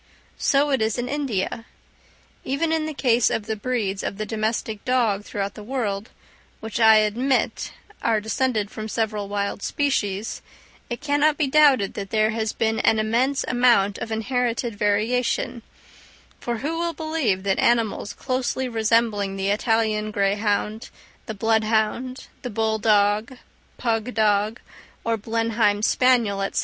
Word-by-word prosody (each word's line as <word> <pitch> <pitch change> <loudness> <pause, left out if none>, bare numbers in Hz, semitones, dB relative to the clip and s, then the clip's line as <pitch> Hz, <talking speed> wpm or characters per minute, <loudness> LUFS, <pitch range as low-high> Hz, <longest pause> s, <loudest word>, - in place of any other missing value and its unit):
So 285 0 +2
it 265 -4 +1
is 220 +1 0
in 245 0 -2
India. 245 -6 -2 0.8
Even 315 +5 -1
in 320 -1 0
the 310 - -4
case 245 -4 +3
of 210 - -2
the 220 0 -2
breeds 210 -4 -2
of 195 - -4
the 215 - -3
domestic 215 0 -2
dog 230 -6 +1
throughout 200 -1 -4
the - - -10
world, 215 -3 -3 0.5
which 220 +1 -5
I 220 -1 +7
admit 225 +5 +1 0.3
are 225 -2 +2
descended 220 -1 -1
from 215 0 -6
several 215 -2 -2
wild 200 0 -2
species, 215 -8 -1 0.5
it 240 - -5
cannot 295 0 +2
be 300 - +2
doubted 270 -7 +4
that 195 -1 -6
there 215 0 +2
has 220 -1 -1
been 225 0 0
an 220 - +3
immense 240 +6 +1
amount 240 -5 +3
of 225 - -5
inherited 235 0 -1
variation; 225 +4 0 0.8
for 240 -1 -3
who 330 +2 -1
will 340 0 -1
believe 310 - -1
that 195 -1 0
animals 230 -3 +1
closely 260 0 -2
resembling 220 -3 +1
the 195 0 -1
Italian 215 0 +1
greyhound, 205 +2 -1 0.4
the 220 - -4
bloodhound, 220 +4 0 0.2
the 250 - -5
bull 220 0 0
dog, 210 +3 +2 0.4
pug 230 -1 -1
dog, 215 +1 +1 0.4
or 230 0 +1
Blenheim 225 -1 0
spaniel, 230 -6 +3
&c. - - +1
225 Hz, 145 wpm, -23 LUFS, 210-250 Hz, 0.8 s, I